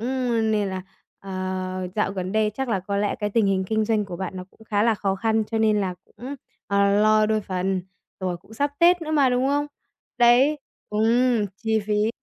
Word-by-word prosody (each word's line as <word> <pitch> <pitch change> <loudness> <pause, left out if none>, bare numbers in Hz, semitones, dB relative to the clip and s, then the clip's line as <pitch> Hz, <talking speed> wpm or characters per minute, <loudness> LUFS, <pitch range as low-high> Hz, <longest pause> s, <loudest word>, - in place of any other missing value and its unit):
ơ, 245 -1 0
nên 215 -2 +1
là, 185 -1 -4 0.4
ờ, 185 -1 -4
dạo 210 -2 0
gần 185 -1 -4
đây 215 0 +2
chắc 265 +1 -3
là 195 -5 0
có 200 +2 -3
lẽ 205 0 0
cái 210 0 -1
tình 220 -1 +2
hình 190 -1 +1
kinh 220 +2 0
doanh 215 -1 +1
của 180 -3 -7
bạn 190 +1 -5
nó 185 - -6
cũng 220 - -19
khá 205 -1 0
là 230 0 +3
khó 195 -2 -1
khăn 220 +2 +1
cho 225 +1 -3
nên 215 -2 +3
là 185 -2 -2
cũng, 265 +4 -9 0.3
ờ, 200 0 +2
lo 215 0 +4
đôi 215 0 +1
phần, 185 -1 -2 0.4
rồi 180 -2 -2
cũng 210 +5 -17
sắp 285 +4 0
Tết 345 0 +5
nữa 310 - -5
mà, 285 -4 +4
đúng 250 +2 +1
không? 290 +1 +1 0.5
Đấy 255 +5 +5 0.3
ừm, 225 +1 +2
chi 220 0 0
phí 210 +1 +1
215 Hz, 215 wpm, -24 LUFS, 195-235 Hz, 0.5 s, Tết